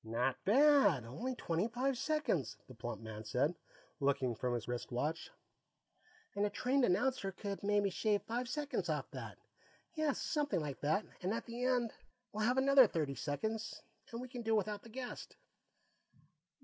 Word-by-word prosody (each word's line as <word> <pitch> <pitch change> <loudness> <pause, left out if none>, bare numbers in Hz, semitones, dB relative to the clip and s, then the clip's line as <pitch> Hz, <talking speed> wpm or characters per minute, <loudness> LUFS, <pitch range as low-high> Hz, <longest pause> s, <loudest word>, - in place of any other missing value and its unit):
"Not 120 +4 -1
bad; 225 - +5
only 235 - -4
twenty 170 -1 0
five 255 +3 0
seconds," 265 - 0
the 130 - -11
plump 115 -1 -5
man 110 -1 -7
said, 125 +9 +1 0.5
looking 140 -3 +2
up 115 - -7
from 125 -1 0
his 115 -2 -4
wrist 120 +1 -4
watch. 150 +7 -2 1.1
"And 200 - +1
a 205 - +2
trained 260 +5 +1
announcer 200 +1 +1
could 200 +1 -5
maybe 205 -1 +2
shave 210 +1 +1
five 240 +2 -3
seconds 295 +2 -2
off - - -2
that. - - -7 0.6
Yes, 310 -4 0
something 295 - 0
like 145 -4 -4
that, 155 +8 +1 0.2
and 185 +2 0
at - - -4
the 240 +2 -3
end 245 -3 +2 0.4
we'll 215 +1 0
have 250 +1 +2
another 270 -2 +7
thirty 155 -7 -1
seconds, 215 +12 -3 0.3
and 230 - -4
we 255 - -5
can 245 -1 -6
do 225 -1 +2
without 210 -1 0
the 230 - -13
guest." 250 +2 -7
210 Hz, 170 wpm, -36 LUFS, -, 1.1 s, another